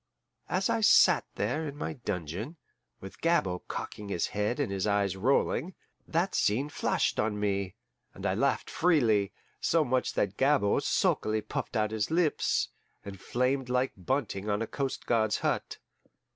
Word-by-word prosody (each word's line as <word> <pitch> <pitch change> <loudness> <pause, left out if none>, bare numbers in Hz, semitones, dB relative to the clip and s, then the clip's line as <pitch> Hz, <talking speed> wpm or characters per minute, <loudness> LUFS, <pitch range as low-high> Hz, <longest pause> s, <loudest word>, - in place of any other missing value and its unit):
As 190 +2 +1
I 225 - 0
sat 210 - +6
there 155 0 -1
in 145 0 -7
my 150 - -3
dungeon, 105 - -5 0.4
with 95 - -11
Gabord 95 - +1
cocking 105 -1 -6
his 85 -4 0
head 105 +6 -1
and 140 -8 0
his 95 +1 -1
eyes 100 -2 +1
rolling, 135 - +1 0.3
that 170 +4 0
scene 130 +8 +1
flashed - - 0
on 105 -1 0
me, 100 -2 -1 0.4
and - - -8
I - - +2
laughed - - 0
freely 115 - +2 0.3
so 165 -2 +2
much 130 0 0
so - - +1
that 100 0 -2
Gabord 135 -7 +3
sulkily 110 0 +1
puffed - - -5
out 110 -1 +1
his 110 -1 -1
lips, 165 -1 +1 0.4
and 100 -2 -8
flamed 125 +1 0
like 125 +1 +1
bunting 105 -1 -2
on 105 +2 0
a - - -2
coast 135 +3 -4
guard's 110 -2 +2
hut. - - -1
110 Hz, 160 wpm, -29 LUFS, 100-145 Hz, 0.4 s, sat